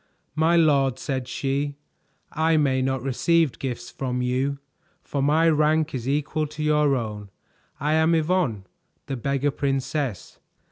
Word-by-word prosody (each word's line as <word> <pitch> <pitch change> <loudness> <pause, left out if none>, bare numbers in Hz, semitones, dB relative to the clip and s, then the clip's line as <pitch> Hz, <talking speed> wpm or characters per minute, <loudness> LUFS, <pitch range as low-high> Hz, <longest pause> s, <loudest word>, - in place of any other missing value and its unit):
"My 160 +3 +3
lord," 140 -6 +3
said 130 -3 -3
she, 140 +2 -2 0.6
"I 160 0 +2
may 135 -3 +2
not 130 -1 -1
receive 150 +2 +1
gifts 125 -2 -5
from 125 0 -3
you, 130 +3 0 0.5
for 140 - -3
my 155 +4 +3
rank 155 0 +2
is 130 -1 -3
equal 150 +2 -1
to 155 +1 -6
your 150 -2 +3
own. 105 -4 -5 0.5
I 150 +2 0
am 160 +1 +3
Yvonne, 155 - 0 0.4
the 135 - -4
Beggar 140 +3 0
Princess." 135 - -3
140 Hz, 140 wpm, -24 LUFS, 130-155 Hz, 0.6 s, My